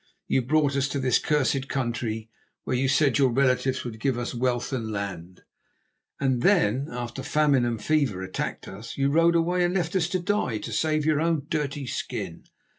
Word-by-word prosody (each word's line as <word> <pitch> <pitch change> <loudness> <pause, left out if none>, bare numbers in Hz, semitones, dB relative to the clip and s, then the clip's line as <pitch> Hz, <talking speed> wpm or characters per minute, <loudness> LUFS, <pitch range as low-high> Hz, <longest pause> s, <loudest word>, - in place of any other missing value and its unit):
You 130 - +1
brought 145 +2 +2
us 140 0 +1
to 145 - -3
this 130 -3 +3
cursed 135 -2 0
country, 115 -4 -3 0.3
where - - -1
you 130 +2 +1
said 140 0 +3
your 135 -2 +5
relatives 130 +1 +1
would 115 -3 -7
give 130 +1 0
us 120 +1 -3
wealth 125 +1 -1
and 115 -4 -2
land, 95 -3 -6 0.8
and 130 -3 +1
then, 140 - +3
after 120 +1 -5
famine 145 -2 +2
and 115 -2 -2
fever 130 -7 0
attacked 95 - -4
us, 105 +4 -8
you 140 0 +2
rode 165 +2 +4
away, 175 +2 +2
and 175 +1 +1
left 175 -1 -1
us 175 -2 +1
to 185 - 0
die 175 - 0
to - - -6
save 155 -1 +1
your 155 -1 +2
own 165 -4 0
dirty 145 -2 -2
skin. 125 - -5
135 Hz, 190 wpm, -26 LUFS, 120-155 Hz, 0.8 s, your